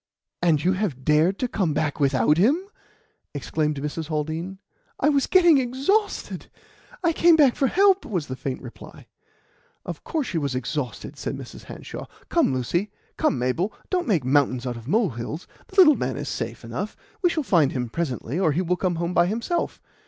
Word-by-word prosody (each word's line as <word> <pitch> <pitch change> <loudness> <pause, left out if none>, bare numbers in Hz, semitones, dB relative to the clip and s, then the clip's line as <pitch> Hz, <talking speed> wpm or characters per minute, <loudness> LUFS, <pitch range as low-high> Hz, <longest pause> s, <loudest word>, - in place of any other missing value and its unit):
"And 160 -4 +3
you 185 +2 +3
have 185 -10 -3
dared 155 +6 +3
to 250 - -1
come 180 -10 -1
back 150 -2 -1
without 140 +2 +3
him?" 260 - +4 0.8
exclaimed 150 +1 -1
Mrs. 150 +2 -4
Haldean. 160 +4 -3 0.4
"I - - +3
was 280 -2 +2
getting 345 -6 +6
exhausted. 275 - -1 0.6
I 335 -1 +3
came 335 +1 +5
back 285 -6 +5
for 270 - +2
help," 390 +5 +4
was 180 -8 -2
the 130 - -5
faint 130 0 -5
reply. - - -11 0.8
"Of - - -6
course 315 -5 -2
she 170 - -2
was 140 -3 -2
exhausted," 130 -1 -4
said - - -3
Mrs. - - -10
Hanshaw. - - -8 0.2
"Come, - - +3
Lucy: 150 - -1 0.3
come, - - +1
Mabel; 130 - 0 0.2
don't 360 -4 0
make 175 - +1
mountains 130 -2 +2
out 125 -1 -3
of 115 0 -10
molehills. 160 - -1 0.2
The 385 - -16
little 360 -6 +8
man - - -2
is - - -5
safe - - -5
enough. - - -5 0.2
We 355 - +4
shall 320 -2 -1
find 165 - +3
him 125 -2 -2
presently, 135 +1 -3
or 160 -6 +2
he 180 +5 0
will 180 +1 0
come 180 -2 0
home 170 +2 -2
by 175 0 +4
himself. 235 - -2
170 Hz, 180 wpm, -24 LUFS, -, 0.8 s, little